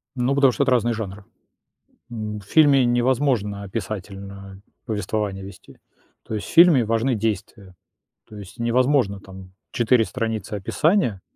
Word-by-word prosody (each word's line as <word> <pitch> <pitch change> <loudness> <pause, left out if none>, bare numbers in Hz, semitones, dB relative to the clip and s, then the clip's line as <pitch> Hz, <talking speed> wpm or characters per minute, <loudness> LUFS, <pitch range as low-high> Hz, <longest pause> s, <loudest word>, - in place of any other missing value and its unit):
Ну, 130 +2 0
потому 140 -2 +5
что 140 - 0
это 130 - 0
разные 120 -1 +2
жанры. 105 -2 -6 0.9
М, 110 -2 -5
в 100 - -16
фильме 140 0 +4
невозможно 120 -4 0
описательно 100 -1 -7 0.2
повествование 105 -3 -3
вести. 95 -1 -13 0.5
То 110 - -6
есть 105 - -4
в - - -9
фильме 165 -8 +6
важны 115 +4 0
действия. 100 -3 -4 0.6
То 105 - -11
есть 100 +4 -12
невозможно 120 -3 +1
там 95 -1 -13 0.2
4 120 -1 +2
страницы 115 -4 -4
описания, 115 - 0
110 Hz, 135 wpm, -22 LUFS, 100-125 Hz, 0.9 s, фильме